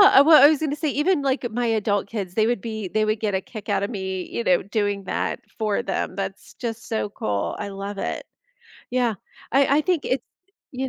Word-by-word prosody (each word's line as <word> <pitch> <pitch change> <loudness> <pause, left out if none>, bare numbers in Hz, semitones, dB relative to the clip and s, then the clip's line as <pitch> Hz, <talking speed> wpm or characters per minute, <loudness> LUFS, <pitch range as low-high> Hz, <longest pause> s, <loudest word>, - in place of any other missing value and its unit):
eh, 270 - +10
well 310 +2 +8
I 290 - +10
was 310 - +2
gonna 300 -2 -1
say, 305 0 -1
even, 295 +4 +2
like, 265 -2 0
my 240 +2 -1
adult 210 -3 +1
kids, 195 -5 -4
they 215 +2 +2
would 240 -4 0
be 220 -3 -4
they 215 +3 +1
would 215 0 0
get 210 -3 0
a 190 - 0
kick 215 0 -9
outta 200 - +1
me, 190 -4 -4
you 235 - -3
know, 180 -4 +3
doing 205 -1 -1
that 185 - -2 0.2
for 215 -2 0
them, 190 -1 -2
that's 195 0 -6
just, 230 -2 -5
so 220 -2 -1
cool, 100 - -2
I 205 - -3
love 200 +1 -6
it, - - -3 0.7
yeah, 245 -2 +1 0.4
I 275 +2 +4
I - - +4
think 350 -3 0
it's 255 -1 0 0.5
you 265 +1 -1
220 Hz, 220 wpm, -24 LUFS, 200-265 Hz, 0.7 s, eh